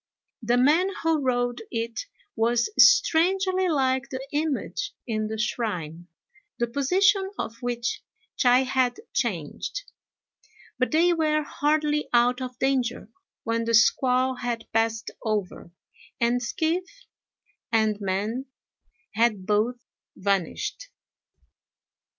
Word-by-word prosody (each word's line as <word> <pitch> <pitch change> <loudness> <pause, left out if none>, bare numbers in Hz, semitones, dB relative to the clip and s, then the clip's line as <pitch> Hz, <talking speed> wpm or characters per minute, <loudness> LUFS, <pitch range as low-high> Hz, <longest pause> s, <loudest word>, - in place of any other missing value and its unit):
The 240 +2 +1
man 305 +9 +4
who 325 -2 +2
rowed 245 -2 0
it 230 - -4 0.3
was 235 - +1
strangely 375 -4 +4
like 265 -3 +1
the 265 0 -6
image 315 +7 -2
in 215 -2 -2
the 220 +1 -4
shrine, 175 -7 -3 0.5
the 235 - +1
position 380 - +2
of 225 - -4
which 245 0 -2 0.3
Chai 250 0 +4
had 255 -2 0
changed; 230 - -3 1.0
but 255 - +2
they 340 +3 +3
were 305 -2 +1
hardly 300 0 0
out 245 +2 +3
of 250 -1 -6
danger 255 -4 -1 0.3
when 230 0 -1
the 230 0 +2
squall 255 +2 +3
had 240 -2 -3
passed 225 0 0
over, 210 -6 -3 0.5
and 240 +1 +2
skiff 345 - -2 0.7
and 220 -2 +1
man 210 +7 -2 0.7
had 215 -3 +1
both 225 +4 0 0.3
vanished. 200 - -2
245 Hz, 110 wpm, -25 LUFS, 225-300 Hz, 1.0 s, man